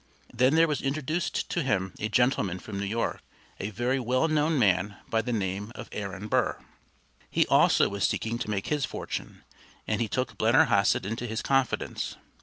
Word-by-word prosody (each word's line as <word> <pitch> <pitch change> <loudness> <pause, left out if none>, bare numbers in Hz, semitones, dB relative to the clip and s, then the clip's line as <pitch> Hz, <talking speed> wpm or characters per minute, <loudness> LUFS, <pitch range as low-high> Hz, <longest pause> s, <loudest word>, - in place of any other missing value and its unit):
Then 130 +5 +3
there 165 +1 +5
was 150 -2 -1
introduced 155 +5 -1
to 175 - 0
him 95 - 0
a 110 - -2
gentleman 105 -5 +2
from 100 +1 -6
New 100 - -2
York, 115 +3 -2 0.4
a 100 - -3
very 120 +6 0
well 130 +5 +1
known 155 0 +2
man 100 -3 +2
by 115 - +2
the 125 +2 -4
name 100 0 -2
of 120 - -8
Aaron 100 0 -5
Burr. - - +1 0.7
He - - +3
also - - +4
was 100 0 -3
seeking 115 +1 0
to 110 - -4
make 100 -2 -1
his 150 -2 0
fortune, - - -5 0.4
and - - 0
he - - +1
took - - -3
Blennerhassett - - +4
into 115 +4 -3
his 110 0 -3
confidence. 135 -3 0
115 Hz, 180 wpm, -28 LUFS, 100-135 Hz, 0.7 s, there